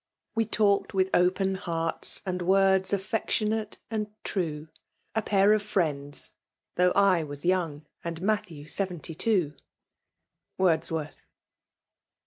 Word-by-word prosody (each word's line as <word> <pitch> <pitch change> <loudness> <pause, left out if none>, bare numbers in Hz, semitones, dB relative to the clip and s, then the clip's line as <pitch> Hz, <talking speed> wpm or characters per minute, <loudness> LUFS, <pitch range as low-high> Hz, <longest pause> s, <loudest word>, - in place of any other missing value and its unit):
We 225 -1 +1
talked 205 -1 +2
with 190 0 +2
opea 190 +2 +2
health 165 -2 -3
and 180 -1 -2
voida 190 +1 +3
Affectionate 215 +2 -1
and 215 -1 -1 0.2
true; 160 -5 -2 0.4
A 220 - +1
pair 200 0 +4
of 215 - +2
friends, 150 -9 -2 0.4
though 180 0 +3
I 195 -4 +4
was 145 0 -7
young. 165 -5 0 0.2
And 170 -1 -4
Matthew 185 -6 -2
wvealiy 175 -2 -2
two. 180 -5 +1 1.0
WORDfWORTH. 160 -4 0
185 Hz, 115 wpm, -28 LUFS, 165-200 Hz, 1.0 s, pair